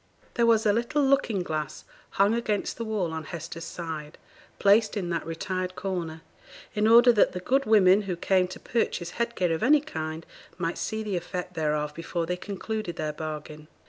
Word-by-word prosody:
There 235 -1 +2
was 225 -1 +4
a 205 - +4
little 245 +6 +1
looking 240 -8 +2
glass 155 -3 -4 0.3
hung 200 +2 +4
against 215 -3 -1
the 230 - -3
wall 205 -7 -2
on 160 -1 -4
Hester's 165 +1 -7
side, 160 -3 -6 0.4
placed 210 +2 +4
in 175 -3 -2
that 165 -2 -2
retired 185 +2 -3
corner, 170 -4 -4 0.5
in 215 -1 +2
order 240 +2 +8
that 210 - +4
the 180 - -3
good 270 +9 +1
women 200 -2 +6
who 180 - 0
came 185 +1 +2
to 185 - -9
purchase 175 -7 -1
head 235 +3 -2
gear 180 -3 +1
of 160 - -2
any 290 +6 +6
kind 160 - -5 0.3
might 165 +1 -2
see 220 0 -2
the 205 -4 -2
effect 180 +1 -5
thereof 150 -2 -1
before 165 +1 -3
they 180 - -1
concluded 200 0 -4
their 155 -2 -3
bargain. 155 0 -7
185 Hz, 185 wpm, -27 LUFS, 165-220 Hz, 0.5 s, order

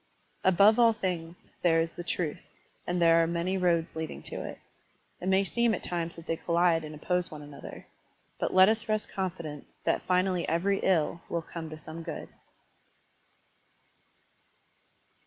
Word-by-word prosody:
Above 200 +5 +6
all 230 -1 +6
things, 180 -5 -3 0.2
there 165 -2 +4
is 165 0 -1
the 175 - -6
truth, 165 -2 -2 0.5
and 175 0 0
there 165 -1 +6
are 165 - +2
many 170 +3 -1
roads 170 -3 +1
leading 160 0 -5
to - - -6
it. - - -7 0.6
It 180 - -4
may 190 +1 +4
seem 235 +3 +1
at - - -8
times 170 -1 -3
that 165 - -11
they 165 - -1
collide 170 -1 +2
and 155 0 -7
oppose 180 +4 -1
one 150 -1 -9
another. 145 -1 -10 0.5
But - - 0
let 185 0 +7
us 220 +1 0
rest 215 0 0
confident 170 -6 -4 0.2
that - - +1
finally 185 -1 +1
every 195 +4 +1
ill 170 -2 +1
will 170 -1 -2
come 160 0 -7
to 155 - -8
some 160 +1 -9
good. - - -6
175 Hz, 160 wpm, -29 LUFS, 165-190 Hz, 0.6 s, let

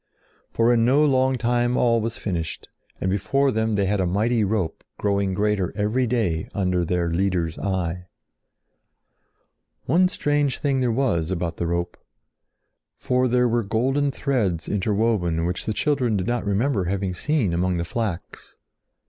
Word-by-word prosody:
For 115 +1 +2
in 115 -1 +3
no 140 +6 +4
long 130 -2 +2
time 120 +1 +1
all 115 -2 +3
was 115 +1 -3
finished 85 -5 -4 0.3
and - - -2
before 135 +7 +1
them 110 -1 0
they 100 -1 +1
had 100 +1 0
a 95 - +1
mighty 110 +5 +1
rope 100 -5 -2
growing 100 -2 0
greater 105 -2 0
every 110 +5 +1
day 105 -9 -1
under 90 -3 +1
their 85 0 -1
Leader's 90 -3 -1
eye. 90 -2 -2 1.8
One 180 +3 +4
strange 145 -6 0
thing 140 -2 0
there 125 -2 +1
was 110 -10 0
about 85 -2 -3
the 85 - -2
rope. 85 +1 -2 1.0
For 125 0 +1
there 125 0 +3
were 120 0 +1
golden 130 +7 0
threads 115 - -1
interwoven 100 -5 0
which 90 +1 -3
the - - +1
children 130 -5 +1
did 90 - -2
not 120 -2 -2
remember 100 0 +1
having 95 0 -2
seen 120 - 0
among 90 +1 0
the 85 - -2
flax. 105 -3 -5
105 Hz, 155 wpm, -23 LUFS, 90-125 Hz, 1.8 s, no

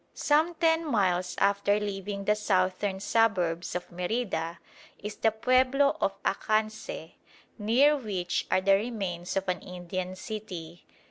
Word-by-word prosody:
Some 315 +4 +2
ten 325 0 +3
miles 185 - +1
after 200 +1 +2
leaving 200 -1 -4
the 210 - +4
southern 190 -1 0
suburbs 185 -7 +1
of 180 - -4
Merida 180 -3 -2 0.4
is 210 0 -7
the 225 - +3
pueblo 255 +5 +3
of 195 - +2
Acanceh, 215 -5 -1 0.5
near 250 +8 +4
which 190 - -2
are 185 - +3
the 195 +1 +4
remains 195 -5 -2
of 195 - -1
an 185 - 0
Indian 180 +1 -5
city. 185 -5 -7
200 Hz, 130 wpm, -28 LUFS, 180-225 Hz, 0.5 s, the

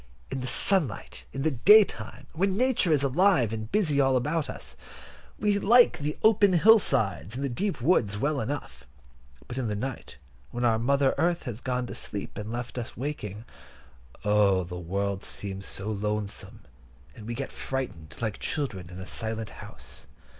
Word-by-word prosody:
In 135 -1 -3
the 125 - -4
sunlight—in 135 - 0
the 160 - +2
daytime, 135 - +4
when 190 +3 0
Nature 250 -8 +2
is 145 -3 +3
alive 140 - +3
and 110 0 -5
busy 155 -9 +2
all 135 -1 +3
around 150 +4 -1
us, - - -9 0.6
we 205 -1 +1
like 235 +4 +5
the 150 +1 -3
open 205 -3 +5
hill 220 +6 +7
sides 105 - 0
and 135 - -3
the 140 - 0
deep 190 - -2
woods 120 - +2
well 145 +4 0
enough: 110 - -5 0.6
but 125 - -5
in 125 - -1
the 105 - -2
night, 130 - -6 0.3
when 120 0 -2
our 110 -2 +3
Mother 140 +3 +2
Earth 170 +2 +1
has 120 -3 -6
gone 125 -1 -1
to - - -7
sleep, 100 -2 -6
and 105 +1 -6
left 120 +1 -4
us 120 - -7
waking, 115 -6 -5 0.8
oh! 100 -3 +3
the 90 0 -7
world 100 +3 -2
seems 95 -1 -4
so 100 +3 -3
lonesome, 105 0 -3 0.5
and 110 -3 -10
we 120 - -3
get 135 +2 -4
frightened, 95 - -5
like 110 -3 -3
children 100 - -3
in 90 0 -9
a 95 - -6
silent 110 0 -5
house. - - -11
125 Hz, 170 wpm, -27 LUFS, 105-150 Hz, 0.8 s, hill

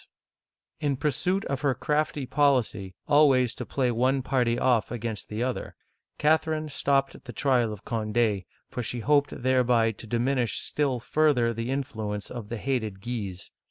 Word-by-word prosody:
*' - - -59
In 140 -2 0
pursuit 180 +8 0
of 135 -2 -3
her 140 -3 +1
crafty 150 +1 -1
policy 125 - +1
always 135 -5 +5
to - - -7
play 130 -3 0
one 130 +3 +1
party 125 -3 +1
off 120 -3 +2
against 115 -3 -4
the 110 +3 -2
other, 130 0 -3 0.4
Catherine 155 0 +1
stopped 135 -1 0
the 125 - -7
trial 125 -4 +1
of 105 -1 -9
Cond6, 110 -3 0 0.2
for 125 - -4
she 120 +1 -4
hoped 145 +1 +1
thereby 125 -3 +3
to 110 +1 -11
diminish 120 +1 0
still 140 -4 -1
further 125 -3 +2
the 115 +2 -4
influence 110 -7 -3
of 115 -4 -7
the 120 - -3
hated 110 -5 -2
Guises. 100 -5 -5
125 Hz, 160 wpm, -27 LUFS, 115-140 Hz, 0.4 s, always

